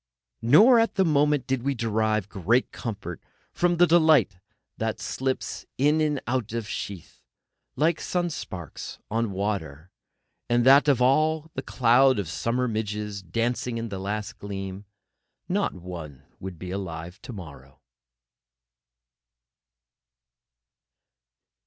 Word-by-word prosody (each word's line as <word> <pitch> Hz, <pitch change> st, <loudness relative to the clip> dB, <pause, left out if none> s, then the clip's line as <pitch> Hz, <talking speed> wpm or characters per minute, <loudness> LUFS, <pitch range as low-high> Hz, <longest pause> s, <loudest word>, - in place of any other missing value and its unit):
Nor 210 Hz, -, +7 dB
at 230 Hz, -, +1 dB
the 190 Hz, -1 st, +3 dB
moment 150 Hz, -3 st, +2 dB
did 135 Hz, -2 st, -1 dB
we 140 Hz, +2 st, -1 dB
derive 110 Hz, -3 st, 0 dB
great 110 Hz, +5 st, +1 dB
comfort 100 Hz, -7 st, -6 dB, 0.3 s
from 175 Hz, -1 st, +1 dB
the 175 Hz, -, +7 dB
thought 160 Hz, -, +5 dB, 0.5 s
that -, -, -1 dB
life -, -, -20 dB
slips 130 Hz, 0 st, -3 dB
in 150 Hz, +4 st, +3 dB
and 150 Hz, -2 st, +1 dB
out 120 Hz, -3 st, -2 dB
of 115 Hz, -3 st, -3 dB
sheath, 100 Hz, -4 st, -7 dB, 0.5 s
like 160 Hz, +2 st, +1 dB
sun 175 Hz, -1 st, -1 dB
sparks 90 Hz, -, -7 dB
on 115 Hz, -1 st, 0 dB
water, 95 Hz, -5 st, -3 dB, 0.6 s
and 120 Hz, 0 st, +3 dB
that 140 Hz, +3 st, +7 dB
of 135 Hz, -4 st, +4 dB
all 155 Hz, +4 st, +2 dB
the 135 Hz, -, -3 dB
cloud 130 Hz, 0 st, +4 dB
of 100 Hz, -5 st, -2 dB
summer 120 Hz, +8 st, -1 dB
midges 105 Hz, -2 st, -3 dB
dancing 115 Hz, +6 st, -2 dB
in 115 Hz, 0 st, -4 dB
the 100 Hz, -2 st, -5 dB
last 105 Hz, +2 st, -4 dB
gleam, 95 Hz, 0 st, -6 dB, 0.6 s
not 195 Hz, -, 0 dB
one 85 Hz, -6 st, -9 dB, 0.2 s
would 95 Hz, -2 st, -7 dB
be 90 Hz, +2 st, -7 dB
alive 90 Hz, -1 st, -6 dB
to -, -, -9 dB
morrow. 70 Hz, -, -11 dB
115 Hz, 125 wpm, -26 LUFS, 95-140 Hz, 0.6 s, Nor